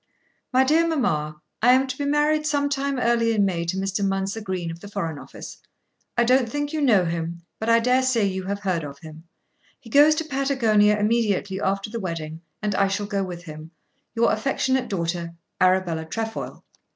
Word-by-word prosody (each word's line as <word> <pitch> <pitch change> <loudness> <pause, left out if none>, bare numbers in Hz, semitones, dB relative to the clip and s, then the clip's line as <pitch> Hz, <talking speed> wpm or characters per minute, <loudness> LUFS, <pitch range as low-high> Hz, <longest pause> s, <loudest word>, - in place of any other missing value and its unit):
"My 260 +1 +4
dear 320 +5 +3
mamma. 155 - -1 0.2
I 245 +3 +6
am 260 +1 +4
to 260 -1 -5
be 285 - -3
married 300 +1 +2
some 285 -1 +1
time 275 0 -1
early 235 -1 +2
in 205 -2 +3
May 170 -3 -1
to 180 +3 -2
Mr. 195 +1 -1
Mounser 195 +2 -1
Green 185 -4 -3
of 165 - -9
the 205 - -10
Foreign 165 -7 -4
Office. - - -10 0.6
I 240 - +5
don't 250 0 +3
think 290 +4 -3
you 310 - -1
know 215 -10 +4
him, 170 0 -4 0.2
but 220 - -2
I 230 0 +6
daresay 250 -2 +2
you 190 -1 -2
have 200 +1 -3
heard 185 -5 -1
of 140 -1 -8
him. 160 +2 -12 0.5
He 225 - -15
goes 295 +3 +6
to 320 - -1
Patagonia 235 -8 +2
immediately 210 -3 0
after 195 +1 -1
the 230 - -4
wedding, 165 -4 -5 0.2
and 210 -1 0
I 195 +1 +2
shall 200 +1 -2
go 200 -1 -1
with 175 -2 -7
him. 155 -1 -9 0.5
Your 230 0 +3
affectionate 260 +2 0
daughter, 170 -3 -3 0.3
Arabella 185 -3 +2
Trefoil." 220 +7 -5
205 Hz, 190 wpm, -24 LUFS, 180-255 Hz, 0.6 s, I